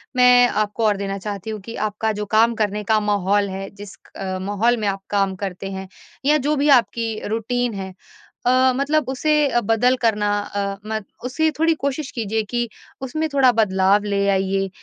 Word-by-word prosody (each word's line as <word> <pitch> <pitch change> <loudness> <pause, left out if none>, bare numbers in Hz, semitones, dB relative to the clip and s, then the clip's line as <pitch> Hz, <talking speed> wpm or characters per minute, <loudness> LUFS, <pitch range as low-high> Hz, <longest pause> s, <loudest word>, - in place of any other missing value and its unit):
मैं 250 -1 +6
आपको 215 +1 -1
और 205 -2 +2
देना 195 0 -3
चाहती 205 +1 -6
हूँ 215 -1 -4
कि 230 +4 -8
आपका 220 +1 -2
जो 210 - -2
काम 225 +3 +3
करने 210 -1 -1
का 220 -1 +4
माहौल 205 -1 +1
है, 195 +1 -5
जिस 205 0 -11 0.2
क 190 -1 -4
माहौल 205 +5 +1
में 210 - -1
आप 195 0 -2
काम 195 -2 +1
करते 195 0 -5
हैं, 190 0 -6 0.4
या 300 +2 +5
जो 295 +2 0
भी 290 +1 +1
आपकी 230 -2 -4
रूटीन 235 +2 -1
है 190 -1 -6 0.5
अ, 255 0 +4
मतलब 280 +1 0
उसे 285 -2 +2
बदल 225 +4 +3
करना, 210 -3 +1
अ, 200 -1 -4
म 220 0 -1 0.3
उसे 315 +5 +1
थोड़ी 325 0 +4
कोशिश 280 +1 -2
कीजिए 220 -1 -2
कि 240 -1 -1 0.3
उसमें 310 +5 -2
थोड़ा 265 -3 +5
बदलाव 200 -2 +2
ले 200 -1 0
आइए, 195 0 0
215 Hz, 180 wpm, -21 LUFS, 200-250 Hz, 0.5 s, मैं